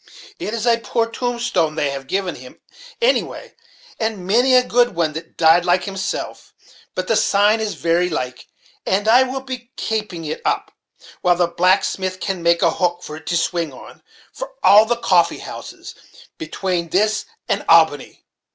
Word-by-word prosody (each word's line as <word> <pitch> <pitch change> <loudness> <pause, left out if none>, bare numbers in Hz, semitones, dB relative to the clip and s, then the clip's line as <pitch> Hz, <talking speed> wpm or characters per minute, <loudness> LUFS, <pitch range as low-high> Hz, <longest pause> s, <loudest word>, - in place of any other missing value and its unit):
It 215 - -4
is 230 0 -3
a 235 -1 +3
poor 230 0 -1
tombstone 235 -9 -1
they 145 -3 0
have 135 -1 -7
given 190 +1 -1
him, 125 0 -13 0.4
anyway, - - 0 0.5
and 220 -5 -3
many 245 +7 +3
a 250 - +6
good 245 -4 +2
one 165 -2 0
that 165 +1 -9
died 165 +1 +5
like 180 +1 +2
himself; 195 -1 -5 0.4
but 185 0 -3
the 225 - +2
sign 210 +2 +3
is 215 -2 -3
very 170 +2 +1
like, 130 -6 -4 0.4
and 200 +3 0
I 240 +3 +6
will 260 +1 -2
be 255 -2 -8
kapeing 210 -7 -3
it 155 - -5
up, - - -1 0.5
while 180 -1 +3
the 175 0 +2
blacksmith 185 +1 0
can 190 -2 -3
make 170 0 +2
a 170 - +4
hook 175 0 -1
for 150 - -7
it 155 -1 -15
to 175 - +1
swing 165 -1 -1
on, - - -13 0.3
for - - -7
all 210 +2 +7
the 240 +1 0
'coffee 180 -7 +2
houses' - - -9 0.5
betwane 170 +1 -3
this 215 +4 +1 0.2
and - - -1
Albany." - - +3
185 Hz, 170 wpm, -20 LUFS, 170-225 Hz, 0.5 s, all